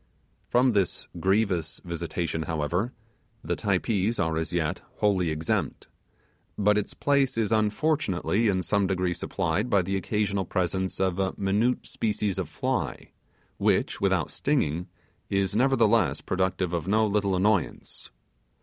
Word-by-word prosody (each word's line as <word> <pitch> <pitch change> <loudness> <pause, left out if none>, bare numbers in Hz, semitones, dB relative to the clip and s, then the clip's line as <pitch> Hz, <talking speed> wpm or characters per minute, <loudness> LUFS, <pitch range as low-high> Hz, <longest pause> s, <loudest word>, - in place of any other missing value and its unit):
From 125 +1 +4
this 100 -5 0
grievous 95 -5 +1
visitation, 85 -1 -3
however 80 +8 -1 0.5
the - - -1
Typees 100 +2 0
are 80 -1 +1
as 80 0 -2
yet 85 0 -1
wholly 95 -5 +2
exempt; 80 +1 -2 0.7
but 105 0 +3
its 105 -1 -2
place 140 -4 +1
is 110 -2 0
unfortunately 110 - +1
in 95 -3 +1
some 100 0 +1
degree 90 -1 0
supplied 85 +6 -1
by 100 -5 +3
the 95 +2 -2
occasional 100 0 0
presence 95 +1 -1
of 95 -1 0
a 95 -1 0
minute 105 +6 +1
species 105 -3 -1
of 90 -5 -3
fly, 75 - -3 0.5
which, - - +1
without - - +1
stinging, 90 - 0 0.4
is 100 0 0
nevertheless 115 -6 +3
productive 95 -1 -1
of 85 -1 -2
no 110 +2 +3
little 100 -2 +1
annoyance. 95 -1 -1
95 Hz, 130 wpm, -27 LUFS, 90-105 Hz, 0.7 s, From